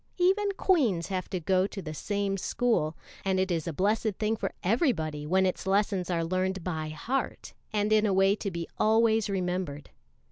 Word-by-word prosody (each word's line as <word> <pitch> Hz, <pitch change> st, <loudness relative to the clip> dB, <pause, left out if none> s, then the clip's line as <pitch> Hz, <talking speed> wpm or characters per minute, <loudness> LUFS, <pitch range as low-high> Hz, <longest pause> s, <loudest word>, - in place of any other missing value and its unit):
Even 390 Hz, +3 st, +3 dB
queens 245 Hz, -, +2 dB
have 185 Hz, -2 st, -3 dB
to 185 Hz, -, -2 dB
goto 190 Hz, +4 st, 0 dB
the 155 Hz, -5 st, -6 dB
same 200 Hz, +4 st, -1 dB
school, 195 Hz, -, 0 dB, 0.3 s
and 190 Hz, -1 st, +1 dB
it 190 Hz, 0 st, 0 dB
is 165 Hz, -2 st, -1 dB
a -, -, -1 dB
blessed 205 Hz, +5 st, 0 dB
thing 220 Hz, +1 st, 0 dB
for -, -, -3 dB
everybody 160 Hz, -, 0 dB
when 190 Hz, +3 st, +3 dB
its 185 Hz, +1 st, -2 dB
lessons 195 Hz, -2 st, +1 dB
are 170 Hz, -2 st, 0 dB
learned 185 Hz, +1 st, -1 dB
by 160 Hz, -3 st, -3 dB
heart 240 Hz, -, -3 dB, 0.2 s
and 210 Hz, 0 st, +1 dB
in 215 Hz, 0 st, +4 dB
a -, -, +1 dB
way 195 Hz, +1 st, +4 dB
to 210 Hz, -, -4 dB
be 170 Hz, -2 st, -5 dB
always 220 Hz, -1 st, +3 dB
remembered. 180 Hz, -6 st, -3 dB
190 Hz, 180 wpm, -28 LUFS, 175-215 Hz, 0.3 s, in